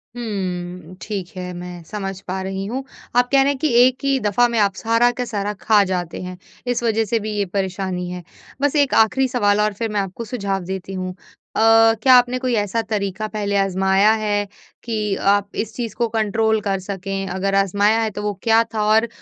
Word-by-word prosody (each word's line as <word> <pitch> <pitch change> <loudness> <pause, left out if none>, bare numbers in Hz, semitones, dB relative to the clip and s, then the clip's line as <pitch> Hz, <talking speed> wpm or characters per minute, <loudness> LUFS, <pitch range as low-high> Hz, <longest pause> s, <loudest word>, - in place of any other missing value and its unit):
हुँ, 180 -6 -5
ठीक 195 -5 -5
है, 180 0 -5
मैं 175 0 -8
समझ 195 +1 -5
पा 190 +1 -3
रही 195 0 -4
हूँ। 250 +6 -4 0.3
आप 245 0 +4
कह 275 -1 +5
रहे 275 +1 +3
हैं 280 - -3
कि 310 - +1 0.2
एक 255 0 -1
ही 275 -1 +2
दफ़ा 215 +2 +2
में 235 - -1
आप 200 -2 +3
सारा 230 +3 +2
का 250 - 0
सारा 205 -3 -3
खा 215 -2 +4
जाते 175 -3 -3
हैं, 180 0 -7 0.3
इस 245 -1 0
वजह 225 -1 +1
से 225 +2 0
भी 215 0 -4
ये 200 - +1
परेशानी 190 -1 -3
है। 180 -1 -6 0.4
बस 285 +1 +1
एक 285 -2 +3
आखिरी 260 +4 0
सवाल 205 -5 +2
और 210 0 +1
फिर 225 +3 -3
मैं 205 - +1
आपको 195 +4 -6
सुझाव 200 -5 -3
देती 190 +1 -5
हूँ। 185 -1 -3 0.4
अ, - - +1 0.4
क्या 260 - +7
आपने 250 0 +4
कोई 255 -1 -1
ऐसा 210 +1 0
तरीका 205 0 -2
पहले 205 -2 -2
आज़माया 190 +1 +3
है 205 -1 0 0.4
कि 215 -3 -1 0.2
आप 200 0 -4
इस 220 - -3
चीज़ 230 -4 -4
को 235 - 0
कंट्रोल 220 0 +1
कर 195 -2 -1
सकें? 195 0 -4
अगर 190 +2 -1
आज़माया 205 +3 +2
है 220 - 0
तो 205 - -6
वो 210 0 -1
क्या 225 0 +4
था 215 -1 0
और 225 +1 +3
205 Hz, 210 wpm, -20 LUFS, 190-230 Hz, 0.4 s, क्या